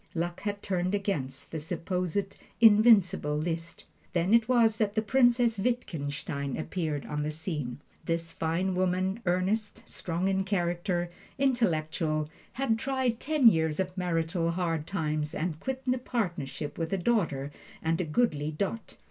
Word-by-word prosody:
Luck 175 +1 -2
had 205 -1 -3
turned 185 0 0
against 140 -9 -3
the 160 - -3
supposed 180 +4 -2 0.2
invincible 205 -8 +6
Liszt. 165 +1 -3 0.3
Then 180 +4 +2
it 230 0 +5
was 230 -3 +4
that 210 -2 0
the 220 - +3
Princess 240 -1 +3
Wittgenstein 145 - -2
appears 155 -3 -2
on 150 0 -2
the 150 - -1
scene. 150 -5 -4 0.3
This 165 0 -1
fine 170 +4 0
woman, 185 +2 0
earnest, 205 +5 0
strong 175 +2 -2
in 195 0 +1
character, 175 -2 -1 0.3
intellectual, 160 - +1 0.2
had 230 -4 0
tried 260 -3 0
ten 300 -4 +4
years 160 -6 +3
of 185 -1 -1
marital 170 -1 0
hard 165 -3 -1
times 155 -5 -2
and 160 -1 -2
quit 265 +4 -4
the 255 0 +1
partnership 175 - -3
with 165 -1 -2
a - - +2
daughter 170 - 0 0.3
and 165 +2 +1
a - - 0
goodly 150 -3 +1
dot. 200 +8 -4
180 Hz, 145 wpm, -29 LUFS, 160-215 Hz, 0.3 s, invincible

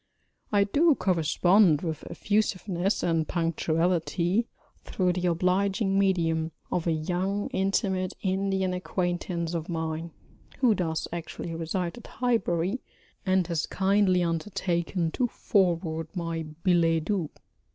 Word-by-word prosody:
I 205 -1 +4
do 295 +9 +3
correspond 175 - +3
with 160 -3 -3
effusiveness 200 -2 0
and 165 -2 +1
punctuality 170 +4 0 0.4
through 180 -2 0
the 180 0 -1
obliging 195 +3 +1
medium 165 -4 +1 0.2
of 175 -1 -1
a - - +3
young 180 +6 -1
intimate 190 -1 0
Indian 190 -1 0
acquaintance 175 -2 -2
of 165 0 -3
mine, 160 0 -3 0.5
who 250 -4 +4
does 165 -5 -2
actually 170 0 -5
reside 170 +5 -3
at - - -13
Highbury, 220 -4 0 0.5
and 185 -1 +3
has 165 -2 -2
kindly 195 -2 +2
undertaken 170 0 -1
to 250 - 0
forward 170 -8 0
my 165 -2 -3 0.2
billets 165 -3 +3
doux. 180 -5 -1
180 Hz, 115 wpm, -27 LUFS, 165-195 Hz, 0.5 s, I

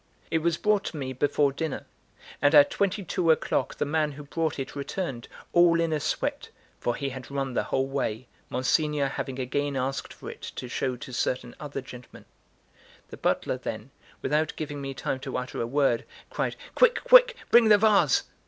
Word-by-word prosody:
It 160 - +2
was 170 +1 0
brought 210 -1 +1
to 160 - -5
me 130 -2 -4
before 145 +2 +2
dinner; 160 0 -4 0.6
and 145 +2 +4
at 145 -1 +7
twenty 200 +1 0
two 175 -1 -1
o'clock 160 - +1
the - - -1
man 150 0 0
who 145 +2 -9
brought 160 +2 -2
it 135 0 -5
returned, 140 -3 -4 0.3
all 170 -1 +5
in 165 -1 +1
a 155 - 0
sweat, - - -2 0.3
for 120 - -1
he 140 -1 -3
had 130 -1 -8
run 135 -2 -2
the - - 0
whole 135 - 0
way, 130 -4 -2 0.2
Monsignor 145 +2 +1
having 135 -1 -4
again 140 +2 -1
asked 135 +1 -2
for - - -8
it - - -14
to 125 - -5
show 125 +1 -2
to 125 +1 -9
certain 125 0 -2
other 145 -2 -5
gentlemen. 125 -1 -12 0.8
The - - -9
butler, - - 0
then, - - -6 0.3
without 155 +3 +1
giving 145 -2 -5
me 135 -1 -5
time 130 - -2
to 135 0 -4
utter 125 0 -4
a 115 - -1
word, 135 -2 +1 0.3
cried: - - -2 0.2
"Quick, - - +4
quick, - - +7 0.2
bring 235 -2 +7
the 210 - +8
vase." 210 -1 +4
145 Hz, 190 wpm, -27 LUFS, 130-165 Hz, 0.8 s, the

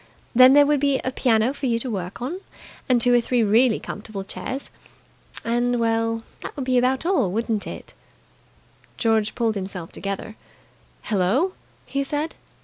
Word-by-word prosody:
Then 255 +2 +8
there 290 0 +7
would 295 0 +2
be 280 -1 +2
a 255 - -1
piano 240 -1 +2
for 280 -1 -3
you 230 -1 +1
to 240 +1 -3
work 190 +2 -5
on, 345 +9 -4 0.5
and 250 -1 +4
two 245 +1 +4
or 240 - +5
three 240 0 +1
really 220 +3 +4
comfortable 205 -2 -6
chairs. 200 +9 -5 0.7
And 240 +1 +1
well, 225 0 0 0.2
that - - -7
would 275 - -4
be 255 -1 +3
about 260 +4 +1
all, 345 - +2
wouldn't 225 0 -1
it?" - - -8 1.0
George 220 -2 +1
pulled 230 -2 +1
himself 190 -4 -6
together. 200 +3 -5 0.7
"Hello!" 225 - +1 0.3
he 275 0 -2
said. 295 +3 -2
235 Hz, 160 wpm, -23 LUFS, 215-260 Hz, 1.0 s, Then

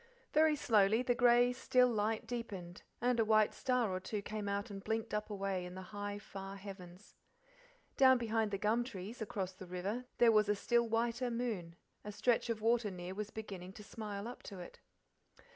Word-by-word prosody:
Very 310 0 +5
slowly 220 -3 +3
the 245 - +2
grey, 245 0 +5
still 250 0 +3
light 220 0 0
deepened, 205 -7 -6 0.2
and 245 -1 +2
a - - +5
white 215 -1 +4
star 250 -5 +1
or 185 - -1
two 200 +2 -4
came 210 -1 -4
out 200 +3 -2
and 195 -1 -7
blinked 225 0 -2
up 210 +1 -2
away 195 -2 -2
in 180 0 -8
the 190 - -7
high, 205 0 -4
far 195 -1 -8
heavens. 190 -2 -10 0.8
Down 260 -1 +7
behind 225 -2 0
the 200 - -2
gum 215 +4 +2
trees, 225 0 -7
across 195 -3 -3
the 185 0 -11
river, 195 +8 -3
there 235 -1 +6
was 210 -1 +4
a 210 - +3
still 235 +3 +2
whiter 235 +2 0
moon; 225 -9 -3 0.3
a 210 - -6
stretch 225 +3 +1
of 225 -2 -1
water 230 -1 +2
near 180 -1 -6
was 210 +1 -4
beginning 195 -4 -7
to 210 - -10
smile 205 0 -6
up 245 - -8
to 200 - -9
it. 175 - -10
215 Hz, 195 wpm, -35 LUFS, 195-235 Hz, 0.8 s, Down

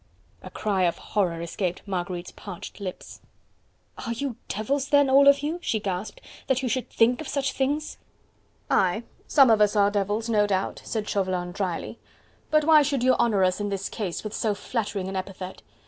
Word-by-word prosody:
A - - -9
cry 195 -4 0
of 170 - 0
horror 175 -5 -1
escaped 175 +1 -3
Marguerite's 180 -2 -4
parched 200 0 -9
lips. 190 -3 -7 0.8
"Are 235 -2 -2
you 265 0 -3
devils 270 +7 -1
then, 285 -2 +4
all 280 +1 +7
of 280 0 +6
you," 320 +4 -2
she 220 - 0
gasped, 205 - -4 0.3
"that 265 0 +1
you - - 0
should 255 +1 -2
think 245 +4 +3
of 310 - -7
such 275 -2 -1
things?" 290 +3 -1 0.7
"Aye! 190 +5 +2 0.2
some 270 -5 +6
of 215 -1 +4
us 210 0 +4
are 205 -1 +4
devils, 205 +2 -1
no 210 -3 +3
doubt," 190 -1 -1
said 215 -2 -3
Chauvelin 185 -3 -1
drily; 185 +3 -4 0.5
"but 305 0 +4
why 310 -1 +7
should 280 -3 0
you 255 0 +5
honour 210 -5 +3
us 185 +1 +2
in 205 0 -2
this 195 -1 -3
case 195 -7 -4
with 215 -1 -5
so 215 -2 0
flattering 205 -4 -3
an 195 - -5
epithet? 185 0 -6
210 Hz, 185 wpm, -26 LUFS, 190-260 Hz, 0.8 s, all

